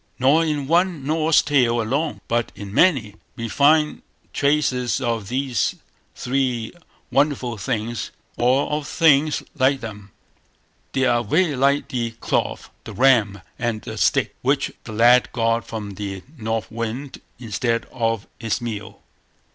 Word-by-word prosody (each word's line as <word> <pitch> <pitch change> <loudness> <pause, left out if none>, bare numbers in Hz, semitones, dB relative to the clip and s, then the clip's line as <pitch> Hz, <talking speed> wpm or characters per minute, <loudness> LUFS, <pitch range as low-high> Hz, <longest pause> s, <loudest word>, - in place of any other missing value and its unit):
Nor 140 +6 +4
in 150 -3 -1
one 170 -1 +1
Norse 155 +1 +3
tale 125 -5 +2
alone, 140 +8 -1
but 120 0 0
in 100 -1 -8
many, 120 - +3 0.2
we 115 - -4
find 150 +4 +3 0.3
traces 140 -4 +1
of 115 -5 -2
these 130 +1 -1 0.4
three 125 -3 -1 0.4
wonderful 135 -4 +1
things, 115 0 -3 0.3
or 130 +3 +2
of 150 -2 -2
things 155 -2 +3
like 135 -1 +2
them. 105 -3 -8 0.8
They 135 -1 +2
are 120 -1 +2
very 155 - +1
like 140 +2 +2
the 120 -2 -1
cloth, - - -2
the - - -9
ram, 110 -7 +3 0.2
and 115 -3 -2
the - - -6
stick, - - +1
which - - +1
the - - -7
lad 120 +3 +5
got 115 -1 0
from 105 -2 -5
the 95 -1 -6
North 110 -3 -3
Wind 115 +5 -5 0.2
instead 115 0 -1
of 115 -3 -1
his 115 -3 -1
meal. 110 -3 -6
125 Hz, 140 wpm, -22 LUFS, 115-140 Hz, 0.8 s, lad